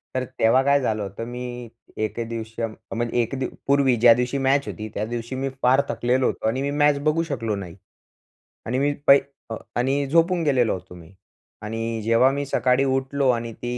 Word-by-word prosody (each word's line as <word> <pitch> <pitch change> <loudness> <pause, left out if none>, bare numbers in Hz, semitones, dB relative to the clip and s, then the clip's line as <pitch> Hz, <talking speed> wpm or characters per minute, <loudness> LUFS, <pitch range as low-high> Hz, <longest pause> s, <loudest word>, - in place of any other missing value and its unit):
तर 130 - 0 0.2
तेव्हा 115 +4 +4
काय 140 +1 +4
झालं 110 -4 -1
होतं, 100 +4 -6
मी 125 -1 -6 0.3
एके 115 +2 -2
दिवशी 115 0 -6
अं, 115 -1 -2 0.2
म्हणजे 120 +1 -2
एक 120 +4 -3
दी 130 - -1 0.2
पूर्वी 140 -2 +3
ज्या 115 0 +7
दिवशी 125 +3 -1
मॅच 135 +1 +1
होती, 110 -1 -6
त्या 105 - -2
दिवशी 120 +2 -5
मी 135 +1 -2
फार 130 +2 +5
थकलेलो 125 +2 +1
होतो - - -2
आणि 130 +4 -1
मी 140 +1 -1
मॅच 145 -1 +4
बघू 155 +2 +2
शकलो 115 -9 -3
नाही 90 -3 -7 0.9
आणि 125 +3 -1
मी 145 +1 +1
पाई 140 0 +8 0.3
अ, 110 - -3 0.2
आणि 135 +3 +1
झोपून 170 +3 +2
गेलेलो 130 -6 +2
होतो 90 -1 -9
मी. 85 +1 -14 0.5
आणि 115 +1 -3
जेव्हा 115 +4 +4
मी 140 +1 -2
सकाळी 130 -1 +2
उठलो 135 +1 0
आणि 115 -2 -1
ती 120 +2 -5
125 Hz, 195 wpm, -23 LUFS, 115-135 Hz, 0.9 s, पाई